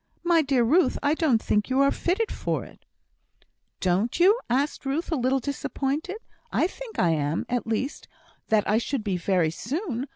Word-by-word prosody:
"My 340 -2 +4
dear 270 -4 +2
Ruth, 290 +4 +3
I 290 +1 +3
don't 310 -8 +2
think 210 0 0
you 260 +1 +1
are 275 0 +4
fitted 395 +6 -1
for - - -2
it!" - - -17 0.9
"Don't 190 - 0
you?" 400 +7 +5
said 275 +4 +2
Ruth, 280 +6 -2
a - - +2
little 260 0 +1
disappointed. 285 - -3 0.3
"I - - +2
think 455 +5 -7
I 170 - +3
am; 150 0 -1
at 245 -1 -2
least, 230 +5 -3 0.4
that 215 -2 +2
I 215 - +3
should 245 0 -3
be 200 -3 -1
very 175 -2 +1
soon. 265 - -3
265 Hz, 175 wpm, -26 LUFS, 220-320 Hz, 0.9 s, you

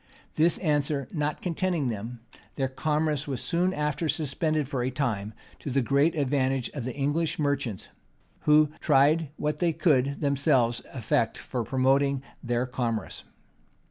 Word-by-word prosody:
This 165 +2 +3
answer 145 -4 0
not 150 -2 -2
contenting 175 -5 0
them, 115 +2 -5 0.3
their 135 -2 0
commerce 150 +1 -1
was 135 -4 -3
soon 180 +2 +1
after 150 0 -1
suspended 155 0 0
for 130 -3 -2
a 125 - 0
time, 110 -6 -2 0.2
to - - -6
the 135 0 +1
great 140 +7 +2
advantage 135 -3 0
of 140 -5 -5
the 130 - -4
English 150 +3 0
merchants, 140 -8 -2 0.6
who 150 0 +5
tried 150 +2 +3
what 150 0 -2
they 170 -2 +2
could 140 -4 +2
themselves 135 -4 +2
effect - - 0
for 125 - -4
promoting 135 +2 +2 0.2
their 120 0 0
commerce. 120 -3 -3
140 Hz, 140 wpm, -27 LUFS, 130-155 Hz, 0.6 s, who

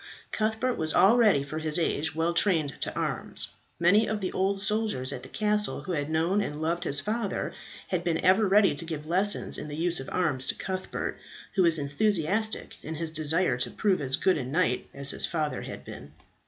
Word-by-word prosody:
Cuthbert 220 +3 -1
was 155 -1 0
already, 205 - +5
for 155 +3 -5
his 155 0 +1
age, 160 -2 -1
well 165 +1 0
trained 165 -7 +1
to - - -3
arms. - - -3 0.3
Many 200 +6 +4
of 215 -1 -1
the 190 -2 -3
old 195 +1 0
soldiers 210 -10 -1
at 125 - -6
the 130 - -11
castle 210 +2 0
who 190 - -6
had 145 -3 -2
known 165 +6 +1
and 150 -7 -4
loved 170 +3 -1
his 145 -2 +3
father, 215 +3 -2 0.4
had 180 -2 -1
been 170 -2 0
ever 195 +3 +5
ready 200 +1 +4
to 145 - -3
give 160 -2 -5
lessons 190 +5 +1
in - - -6
the 145 - -6
use 170 +1 +1
of 135 - -7
arms 145 -8 0
to - - -1
Cuthbert, 185 0 -4 0.3
who 195 - +2
was 170 -2 +4
enthusiastic 195 +8 0
in 160 +2 -6
his 160 0 -2
desire 155 -2 +2
to 125 - -1
prove 195 -6 0
as 135 -1 +3
good 185 +1 +1
a - - -3
knight 135 0 0
as 140 0 0
his - - -2
father 155 -3 -2
had - - -8
been. - - -10
170 Hz, 205 wpm, -27 LUFS, 150-200 Hz, 0.4 s, already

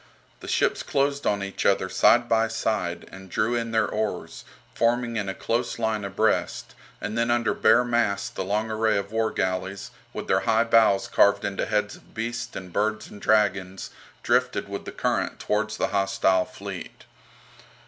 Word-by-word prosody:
The - - -10
ships - - +1
closed 140 +1 0
on 100 -1 +1
each 100 0 -4
other 95 -1 +2
side 120 +6 +4
by 115 0 +3
side, 110 -6 -2
and 95 0 -11
drew 110 +6 0
in 115 -1 -1
their 110 -1 +2
oars, 110 -1 -4 0.3
forming 120 0 +1
in 100 -3 -1
close 120 +1 -1
line 110 -2 -1
abreast, 100 0 -1 0.3
and 105 - -4
then 115 +1 +1
under 120 -1 +2
bare 110 +3 +4
masts 120 -3 +1
the 95 - -4
long 105 +3 -1
array 110 0 +1
of 100 +1 -4
war 110 0 +1
galleys, 95 +1 -3 0.2
with - - -6
their - - +3
high 110 +1 +4
bows 115 -4 +4
carved 100 0 +3
into 100 -1 -2
heads 105 -1 -1
of - - -23
beasts 120 +2 -4
and 90 -2 -8
birds 110 +1 -1
and 105 - -11
dragons, 100 -3 +1 0.3
drifted - - +1
with - - -6
the - - -6
current - - -1
towards 110 +1 -1
the - - 0
hostile 95 -2 +2
fleet. - - -9
110 Hz, 170 wpm, -25 LUFS, 100-115 Hz, 0.3 s, side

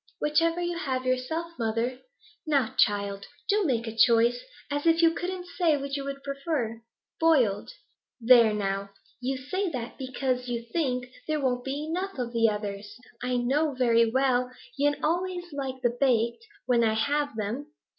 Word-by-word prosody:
'Whichever 330 +3 +2
you 345 -1 -2
have 260 -6 -2
yourself, 255 +7 -1
mother.' 230 +3 -1 0.5
'Now, 280 -7 +2
child, 200 -1 +1 0.2
do 415 0 +3
make 235 -6 0
a 225 -1 -6
choice! 235 +1 +4 0.3
As 290 +3 -1
if 330 0 +5
you 330 0 +6
couldn't 360 +1 -4
say 325 -4 +4
which 275 0 -4
you 280 - -3
would 275 0 -6
prefer.' 275 -5 -3 0.4
'Boiled.' 260 - +3 0.5
'There 235 -2 +6
now, 200 -1 -2 0.3
you 260 +2 -2
say 370 +9 -2
that 250 -4 -6
because 255 -1 -2
you 235 -1 -3
think 255 -7 0 0.2
there 310 -1 0
won't 250 -3 0
be 280 +3 -3
enough 365 +3 -3
of 245 -2 -3
the 230 -1 +4
others. 205 0 -5 0.2
I 250 -1 0
know 275 +4 +1
very 230 -2 +4
well 250 0 +2 0.3
yen 290 +1 +2
always 355 +2 -1
like 265 -2 -4
the 240 -1 +2
baked, 245 - +1 0.2
when 240 -2 +3
I 220 -1 +2
have 285 +3 0
them. 225 +7 -3
255 Hz, 165 wpm, -27 LUFS, 235-300 Hz, 0.5 s, you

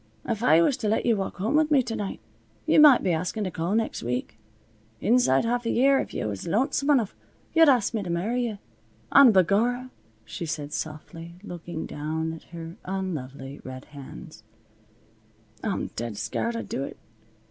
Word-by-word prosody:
If 220 - -2
I 160 +3 +5
was 255 - +2
to 215 - -2
let 220 - +1
you 235 -2 +4
walk 195 -2 -3
home 210 +8 -1
with 310 0 +3
me 280 -4 +4
to 230 -2 -4
night, 200 -2 -4 0.5
yuh - - +4
might 295 -4 +8
be 185 - +2
askin' 180 +6 -2
to 185 - -3
call 170 +5 -1
next 225 0 -1
week. 125 -1 -4 0.6
Inside 230 - +3
half 240 +1 0
a - - +1
year, 270 +3 +4
if - - -4
yuh - - -3
was 100 - -4
lonesome 270 - +1
enough, 250 -9 +2 0.4
yuh'd 325 -2 +7
ask 245 -6 +3
me 220 - -1
to 185 - -6
marry 225 +9 0
yuh. 215 -3 -5 0.5
And 275 -4 +8
b'gorra," 230 +7 +2 0.3
she 170 - -6
said 150 -2 -4
softly, 165 +2 -6
looking 170 -3 -6
down 160 +2 -3
at 165 - -11
her 165 +1 -9
unlovely 145 -8 -5
red 130 +1 -8
hands, 140 -2 -10 1.2
"I'm - - -2
dead 115 -2 -4
scared 230 - -2
I'd 230 - -4
do 135 - -3
it. - - -7
190 Hz, 180 wpm, -26 LUFS, 160-240 Hz, 1.2 s, might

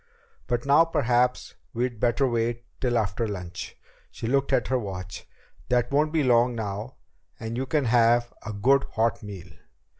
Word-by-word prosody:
But 120 0 -1
now 145 +4 +6
perhaps 125 -6 +1 0.2
we'd 120 -1 -2
better 120 +3 +2
wait 120 0 -1 0.2
till 120 -2 +1
after 110 +1 -1
lunch." 90 -4 -6 0.3
She - - -8
looked 135 +3 +1
at - - +1
her 130 -1 +2
watch. 95 -4 -7 0.4
"That 120 0 +1
won't 150 +2 +2
be 160 -2 +1
long 120 -1 +3
now, 105 +2 -5 0.4
and 115 +1 -5
you 130 +2 -2
can 150 -1 +1
have 120 0 +3
a 110 - -5
good 130 +7 +3
hot 115 +1 +1
meal." 95 -3 -9
120 Hz, 160 wpm, -26 LUFS, 110-130 Hz, 0.4 s, now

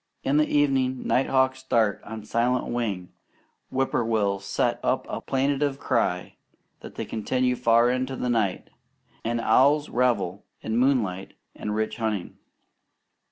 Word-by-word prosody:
In 140 +2 +2
the 150 - +3
evening, 135 -3 +1
night 130 - +2
hawks 130 0 +2
dart 115 -6 +1
on 110 0 -7
silent 120 +3 +1
wing; 105 -7 -3 0.6
whippoorwills 110 -6 0
set 100 - 0
up - - 0
a - - -5
plaintive 140 +1 0
cry 90 -10 -1 0.4
that - - -11
they - - -4
continue 125 +3 0
far 120 0 +4
into 130 +1 -2
the 125 - -3
night; 110 -6 -1 0.5
and 120 +1 -1
owls 140 +6 +3
revel 110 -7 0 0.2
in 110 - -3
moonlight 115 -8 +1 0.2
and 105 0 -4
rich 110 0 -2
hunting. 110 -5 -3
120 Hz, 135 wpm, -25 LUFS, 110-130 Hz, 0.6 s, far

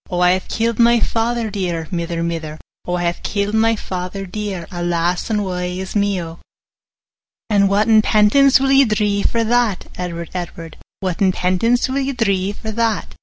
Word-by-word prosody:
20 180 - -5
'O - - 0
I 180 0 +5
hae - - -19
kill'd 230 0 -1
my 235 0 +5
father 230 0 -1
dear, 175 -5 -3
Mither, 170 -1 -2
mither; 160 -2 -4 0.3
O 180 - 0
I 175 - -2
hae 175 0 -1
kill'd 200 0 -2
my 225 +1 +3
father 185 -1 -5
dear, 195 -2 -5
Alas, 175 +1 -1
and 210 -2 0
wae 180 -1 -3
is 190 +2 -6
me, 200 -2 +1
O!' 165 -1 -7 1.1
'And 200 -1 +4
whatten 215 +2 +4
penance 220 +7 +4
will 270 0 +1
ye 275 0 +6
dree 210 -3 0
for 230 +2 +1
that, 230 -4 +1
25 - - -15
Edward, 170 -2 -5
Edward? 170 -2 -6 0.2
Whatten 185 0 +1
penance 185 +7 +1
will 265 +1 -1
ye 275 0 -1
dree 195 -5 0
for 220 +1 -6
that? 225 -1 -1
200 Hz, 185 wpm, -19 LUFS, 180-225 Hz, 1.1 s, ye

